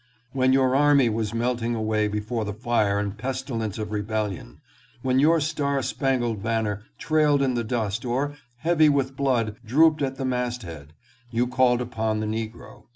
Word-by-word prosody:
When 130 Hz, -1 st, +2 dB
your 130 Hz, -1 st, +3 dB
army 140 Hz, -3 st, +5 dB
was 110 Hz, -1 st, -2 dB
melting 120 Hz, 0 st, -1 dB
away 110 Hz, -1 st, 0 dB
before 105 Hz, +2 st, -2 dB
the 105 Hz, -1 st, -4 dB
fire 110 Hz, -3 st, +1 dB
and 100 Hz, 0 st, -2 dB
pestilence 120 Hz, -3 st, -3 dB
of 105 Hz, -1 st, -4 dB
rebellion; 105 Hz, -, -3 dB, 0.4 s
when 130 Hz, 0 st, +2 dB
your 160 Hz, +4 st, +4 dB
star 145 Hz, -2 st, -1 dB
spangled 120 Hz, -6 st, -1 dB
banner 110 Hz, -2 st, -1 dB, 0.2 s
trailed 150 Hz, -3 st, +2 dB
in 130 Hz, -2 st, +1 dB
the 120 Hz, -1 st, -1 dB
dust 110 Hz, -2 st, -2 dB
or, 130 Hz, +4 st, -1 dB, 0.2 s
heavy 155 Hz, +2 st, +3 dB
with 135 Hz, -2 st, 0 dB
blood, 120 Hz, -6 st, 0 dB
drooped 155 Hz, +6 st, +4 dB
at 135 Hz, -1 st, -1 dB
the 135 Hz, -, -4 dB
mast 125 Hz, -2 st, -2 dB
head, 80 Hz, -4 st, -10 dB, 0.4 s
you 120 Hz, +1 st, +1 dB
called 125 Hz, 0 st, +2 dB
upon 110 Hz, -3 st, -2 dB
the 110 Hz, -, -2 dB
negro. 110 Hz, +1 st, -6 dB
120 Hz, 165 wpm, -25 LUFS, 110-135 Hz, 0.4 s, army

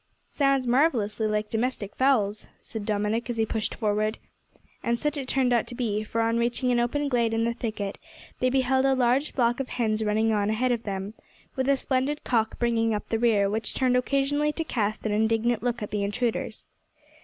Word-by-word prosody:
"Sounds 275 Hz, -2 st, +2 dB
marvellously 240 Hz, -5 st, +2 dB
like 210 Hz, 0 st, -1 dB
domestic 225 Hz, -3 st, -2 dB
fowls," 220 Hz, -6 st, +1 dB
said 220 Hz, -2 st, -7 dB
Dominick, 215 Hz, +3 st, -1 dB
as 240 Hz, -, -2 dB
he 220 Hz, -, +2 dB
pushed 220 Hz, 0 st, -3 dB
forward. 215 Hz, 0 st, 0 dB, 0.6 s
And 235 Hz, 0 st, 0 dB
such 295 Hz, +4 st, -1 dB
it 275 Hz, -3 st, -4 dB
turned 255 Hz, -2 st, +2 dB
out 235 Hz, -, +2 dB
to 245 Hz, -, -8 dB
be, 215 Hz, -4 st, -1 dB
for, 230 Hz, +1 st, -2 dB
on 230 Hz, +1 st, +1 dB
reaching 240 Hz, +2 st, 0 dB
an 240 Hz, -, +2 dB
open 285 Hz, +5 st, 0 dB
glade 235 Hz, -4 st, +1 dB
in 225 Hz, -, +1 dB
the 235 Hz, 0 st, +1 dB
thicket, 215 Hz, -4 st, -4 dB, 0.4 s
they 255 Hz, -, +2 dB
beheld 260 Hz, 0 st, +2 dB
a 270 Hz, 0 st, +3 dB
large 255 Hz, +4 st, +2 dB
flock 240 Hz, -1 st, +1 dB
of 270 Hz, -, -3 dB
hens 220 Hz, -2 st, 0 dB
running 220 Hz, +1 st, +2 dB
on 205 Hz, -1 st, +1 dB
ahead 245 Hz, +4 st, +1 dB
of 235 Hz, -1 st, -1 dB
them, 195 Hz, 0 st, -4 dB, 0.4 s
with 260 Hz, +1 st, 0 dB
a 280 Hz, -, +4 dB
splendid 265 Hz, +3 st, -1 dB
cock 225 Hz, -3 st, 0 dB
bringing 225 Hz, -2 st, +1 dB
up 210 Hz, -, -6 dB
the 225 Hz, -, 0 dB
rear, 220 Hz, -4 st, +3 dB
which 215 Hz, +1 st, -3 dB
turned 255 Hz, -1 st, +2 dB
occasionally 275 Hz, +3 st, +1 dB
to 325 Hz, -, -2 dB
cast 215 Hz, -8 st, -2 dB
an 215 Hz, -, 0 dB
indignant 225 Hz, +2 st, +1 dB
look 240 Hz, -2 st, -2 dB
at 210 Hz, -, -6 dB
the 210 Hz, -, -1 dB
intruders. 230 Hz, +3 st, -2 dB
235 Hz, 200 wpm, -26 LUFS, 215-255 Hz, 0.6 s, a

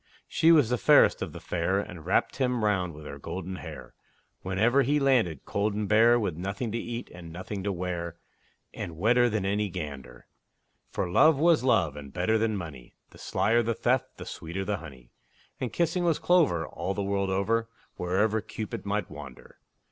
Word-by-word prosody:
She 165 Hz, -, +4 dB
was 145 Hz, -8 st, +5 dB
the 125 Hz, -, +1 dB
fairest -, -, +5 dB
of -, -, -3 dB
the -, -, -9 dB
fair, 90 Hz, +3 st, -1 dB
And 90 Hz, -5 st, -7 dB
wrapt -, -, +1 dB
him 125 Hz, -4 st, 0 dB
round 90 Hz, -6 st, 0 dB
with 75 Hz, 0 st, -11 dB
her 70 Hz, -1 st, -8 dB
golden 95 Hz, +5 st, -5 dB
hair, 75 Hz, -7 st, -9 dB, 0.5 s
Whenever 110 Hz, +9 st, +2 dB
he 145 Hz, +3 st, +2 dB
landed 120 Hz, -, +2 dB
cold 100 Hz, +1 st, -1 dB
and 105 Hz, -1 st, -2 dB
bare, 115 Hz, +3 st, +5 dB
With 100 Hz, -7 st, -2 dB
nothing 100 Hz, +6 st, -4 dB
to 115 Hz, -, -2 dB
eat 120 Hz, +1 st, -6 dB
and 85 Hz, -2 st, -10 dB
nothing 95 Hz, +4 st, -6 dB
to 100 Hz, +1 st, -1 dB
wear, 85 Hz, -2 st, -4 dB, 0.6 s
And 85 Hz, -2 st, -6 dB
wetter 120 Hz, +6 st, +4 dB
than 105 Hz, -3 st, -1 dB
any 100 Hz, +1 st, 0 dB
gander; 70 Hz, -8 st, -7 dB, 0.6 s
For -, -, -2 dB
Love 150 Hz, -, +5 dB
was 160 Hz, -1 st, +4 dB
Love, 95 Hz, -, +2 dB
and 70 Hz, -2 st, -9 dB
better 110 Hz, +8 st, +1 dB
than 110 Hz, -1 st, 0 dB
money; 75 Hz, -9 st, -9 dB, 0.2 s
The -, -, -16 dB
slyer 115 Hz, +3 st, +2 dB
the 115 Hz, 0 st, -1 dB
theft, 125 Hz, +2 st, 0 dB
the -, -, -8 dB
sweeter 90 Hz, +4 st, -5 dB
the 105 Hz, 0 st, -1 dB
honey; 65 Hz, -7 st, -12 dB, 0.5 s
And 125 Hz, -, -3 dB
kissing 175 Hz, +1 st, 0 dB
was 170 Hz, -3 st, +2 dB
clover, 150 Hz, -, +3 dB
all 95 Hz, +5 st, -4 dB
the 100 Hz, -, -2 dB
world 100 Hz, 0 st, -1 dB
over, 110 Hz, +4 st, 0 dB, 0.3 s
Wherever 105 Hz, +5 st, +1 dB
Cupid 105 Hz, -1 st, -6 dB
might 105 Hz, -2 st, -1 dB
wander. 75 Hz, -4 st, -11 dB
100 Hz, 185 wpm, -28 LUFS, 85-115 Hz, 0.6 s, was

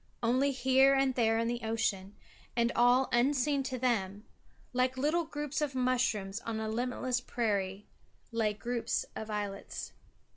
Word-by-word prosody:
Only 255 Hz, +4 st, +3 dB
here 265 Hz, +1 st, +4 dB
and 270 Hz, -1 st, +2 dB
there 225 Hz, -2 st, +2 dB
in 230 Hz, 0 st, 0 dB
the 240 Hz, 0 st, -2 dB
ocean, 215 Hz, -3 st, -1 dB, 0.4 s
and 235 Hz, 0 st, +2 dB
all 245 Hz, +2 st, +4 dB
unseen 275 Hz, +3 st, +2 dB
to 260 Hz, -1 st, -3 dB
them, 210 Hz, -4 st, -1 dB, 0.5 s
like 255 Hz, +1 st, +1 dB
little 310 Hz, +5 st, +1 dB
groups 295 Hz, -1 st, -4 dB
of 285 Hz, -3 st, -1 dB
mushrooms 245 Hz, -6 st, 0 dB
on 225 Hz, -1 st, -4 dB
a 220 Hz, -, -3 dB
limitless 250 Hz, +2 st, -1 dB
prairie, 205 Hz, -5 st, -2 dB, 0.5 s
lay 220 Hz, -2 st, +1 dB
groups 235 Hz, +2 st, -2 dB
of 220 Hz, -, -6 dB
islets. 205 Hz, -2 st, -5 dB
240 Hz, 145 wpm, -31 LUFS, 220-260 Hz, 0.5 s, here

